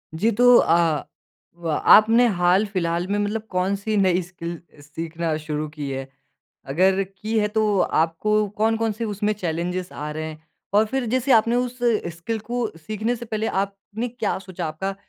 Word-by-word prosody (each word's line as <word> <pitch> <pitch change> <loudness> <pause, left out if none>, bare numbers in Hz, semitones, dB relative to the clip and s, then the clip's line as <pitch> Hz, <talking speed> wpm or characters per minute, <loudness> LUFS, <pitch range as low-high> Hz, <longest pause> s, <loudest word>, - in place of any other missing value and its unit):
जी, 220 +8 +2
तो 245 +3 +6
अ, 165 -3 +3 0.5
व 170 -1 -5 0.2
आपने 225 +3 +7
हाल-फिलहाल 180 -2 +1
में 205 +1 0
मतलब 210 +2 -1
कौन-सी 200 +4 -1
नई 185 -2 +3
स्किल 170 -1 -7 0.2
सीखना 160 +2 -4
शुरू 150 0 -2
की 150 -2 -6
है? 135 0 -4 0.6
अगर 190 +7 +2
की 215 +4 -3
है 210 0 +2
तो 210 -2 +1 0.2
आपको 210 +6 +1
कौन-कौन 225 +1 +1
से 230 +2 -4
उसमें 210 0 -1
चैलेंजेस 180 -1 -3
आ 150 +1 -5
रहे 155 +1 -4
हैं? 155 0 -9 0.3
और 215 +1 +6
फिर 265 +2 -2
जैसे 260 +1 +2
आपने 230 +2 +4
उस 250 0 -2 0.4
स्किल 220 +7 -3
को 245 -1 0
सीखने 215 +7 -2
से 240 - -8
पहले 220 -1 -2 0.2
आपने 200 +4 -5
क्या 225 -5 -2
सोचा, 185 -3 -6
आपका 190 +6 -3
195 Hz, 165 wpm, -23 LUFS, 170-220 Hz, 0.6 s, आपने